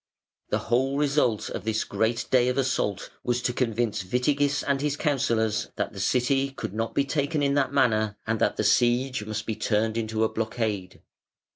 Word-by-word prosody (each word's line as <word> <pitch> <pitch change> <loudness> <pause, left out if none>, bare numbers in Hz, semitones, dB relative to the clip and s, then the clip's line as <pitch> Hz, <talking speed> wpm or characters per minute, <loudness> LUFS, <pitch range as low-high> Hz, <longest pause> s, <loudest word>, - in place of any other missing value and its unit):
The - - +1
whole 130 +4 0
result 140 -6 +1
of - - -5
this 110 0 0
great 115 +1 -1
day 125 -1 +4
of 125 - 0
assault 130 -7 -1
was 120 0 0
to 125 - 0
convince 115 -4 -1
Witigis 140 +7 +1
and 140 -1 +1
his 145 -1 -1
counsellors 120 -8 0
that - - -2
the - - -8
City 135 +6 +1
could 135 -7 -6
not 115 +1 -3
be 140 - +2
taken 145 +2 0
in 140 0 +2
that 140 -1 +1
manner, 110 -3 +2
and 110 0 -1
that - - +1
the - - 0
siege 120 +3 +2
must 110 -1 -3
be 110 - -2
turned 110 +1 0
into 110 -1 -1
a 110 - +2
blockade. 110 -4 -3
120 Hz, 185 wpm, -26 LUFS, 110-135 Hz, -, day